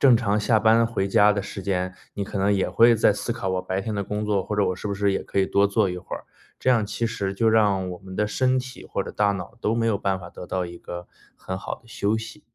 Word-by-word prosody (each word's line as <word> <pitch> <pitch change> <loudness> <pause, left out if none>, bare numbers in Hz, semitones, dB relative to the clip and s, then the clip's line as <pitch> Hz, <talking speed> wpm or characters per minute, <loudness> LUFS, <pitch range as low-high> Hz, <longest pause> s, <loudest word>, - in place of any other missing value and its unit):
正 130 -4 +7
常 105 -3 +1
下 110 +1 +3
班 110 +2 +5
回 100 -4 -1
家 105 +2 +5
的 100 - -1
时 100 0 -7
间， 90 -1 -1 0.2
你 100 - -2
可 - - -6
能 100 +1 +3
也 95 - +1
会 115 +1 +6
在 110 - +5
思 115 +3 -3
考 95 -5 -4
我 95 0 -1
白 95 +1 -2
天 105 +2 -4
的 100 - -1
工 105 +2 -3
作， 100 -2 +1
或 105 - -3
者 105 - +3
我 90 - -1
是 - - -6
不 100 - -1
是 100 0 +1
也 - - -1
可 - - -3
以 95 - +3
多 100 0 +3
做 100 0 +2
一 90 - -4
会 90 - -6
儿？ - - -12 0.3
这 - - -1
样 115 -4 +4
其 115 +3 -2
实 100 -3 -2
就 110 +3 +2
让 100 -4 +3
我 90 - -7
们 95 -1 -10
的 105 0 +1
身 130 +4 +1
体 130 -1 -7
或 100 - -2
者 - - -6
大 105 -1 +2
脑 95 +4 -6
都 105 - +1
没 115 -1 +1
有 110 -3 +2
办 95 -1 -1
法 85 - -9
得 90 - -10
到 90 -1 -2
一 85 0 -9
个 85 0 -8 0.3
很 95 - -5
好 - - -5
的 - - -26
休 110 -1 0
息。 115 +7 -9
100 Hz, 315 characters per minute, -24 LUFS, 95-110 Hz, 0.3 s, 正